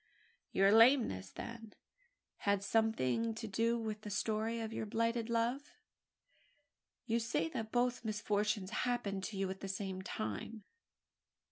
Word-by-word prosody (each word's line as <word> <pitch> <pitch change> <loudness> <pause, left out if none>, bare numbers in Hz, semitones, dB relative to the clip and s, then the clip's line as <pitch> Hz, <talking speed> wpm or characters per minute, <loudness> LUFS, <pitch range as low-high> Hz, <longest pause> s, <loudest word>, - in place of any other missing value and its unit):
"Your 195 +1 +5
lameness, 225 - +5
then, 230 - -8 0.6
had 200 -1 +1
something 220 - +1
to 225 0 -5
do 230 +3 +1
with 215 -2 -4
the 210 - -6
story 220 +3 -1
of 225 -1 -4
your 220 - -3
blighted 230 +2 0
love? 235 +5 0 1.3
You 230 -1 +1
say 230 -7 0
that 220 +5 -4
both 245 0 +1
misfortunes 210 -2 0 0.2
happened 200 -6 -1
to 210 -2 -5
you 195 0 0
at 190 - -7
the 195 - -5
same 195 -1 -3
time!" 190 - -4
220 Hz, 135 wpm, -35 LUFS, 200-230 Hz, 1.3 s, Your